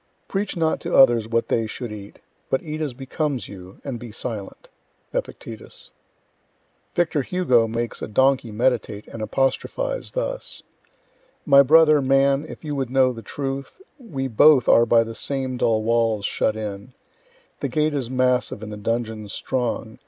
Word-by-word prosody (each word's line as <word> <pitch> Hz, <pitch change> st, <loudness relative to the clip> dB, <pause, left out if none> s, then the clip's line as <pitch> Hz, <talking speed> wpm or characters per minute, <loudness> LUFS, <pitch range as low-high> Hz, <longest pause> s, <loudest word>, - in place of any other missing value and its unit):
Preach 195 Hz, -1 st, -2 dB
not 160 Hz, -1 st, +1 dB
to -, -, -2 dB
others 120 Hz, -4 st, +6 dB
what 115 Hz, 0 st, 0 dB
they 115 Hz, -1 st, 0 dB
should 120 Hz, +1 st, -6 dB
eat, 100 Hz, -1 st, -9 dB, 0.3 s
but 135 Hz, -, 0 dB
eat 155 Hz, 0 st, -5 dB
as 145 Hz, -5 st, -3 dB
becomes 135 Hz, 0 st, -3 dB
you, 95 Hz, -1 st, -12 dB
and 130 Hz, -4 st, -5 dB
be 120 Hz, -1 st, -9 dB
silent. 110 Hz, -, -6 dB, 0.5 s
Epictetus. -, -, -6 dB, 1.0 s
Victor 165 Hz, -4 st, +1 dB
Hugo 130 Hz, -8 st, +2 dB
makes 115 Hz, +1 st, -3 dB
a -, -, -3 dB
donkey 130 Hz, +1 st, +2 dB
meditate 115 Hz, -2 st, 0 dB
and 115 Hz, -, -8 dB
apostrophize 320 Hz, -, -1 dB
thus: -, -, -4 dB, 0.8 s
My 140 Hz, -1 st, +7 dB
brother, 155 Hz, +1 st, +6 dB
man, 135 Hz, +2 st, +2 dB
if -, -, -10 dB
you 150 Hz, -2 st, -3 dB
would 135 Hz, -3 st, -2 dB
know 130 Hz, -1 st, +3 dB
the 115 Hz, -, -9 dB
truth, 135 Hz, -, -5 dB, 0.2 s
We 140 Hz, -, -4 dB
both 130 Hz, +3 st, +5 dB
are 120 Hz, 0 st, +6 dB
by 115 Hz, 0 st, +5 dB
the 115 Hz, 0 st, -7 dB
same 130 Hz, +1 st, -3 dB
dull 110 Hz, -3 st, +1 dB
walls 115 Hz, -2 st, +1 dB
shut 110 Hz, -, 0 dB
in; 105 Hz, +2 st, -6 dB, 0.7 s
The 140 Hz, -, -1 dB
gate 150 Hz, +4 st, +1 dB
is 135 Hz, -5 st, -2 dB
massive 125 Hz, -4 st, 0 dB
and 105 Hz, 0 st, -6 dB
the -, -, -6 dB
dungeon 110 Hz, 0 st, -3 dB
strong. 115 Hz, +1 st, -3 dB
130 Hz, 160 wpm, -23 LUFS, 115-140 Hz, 1.0 s, My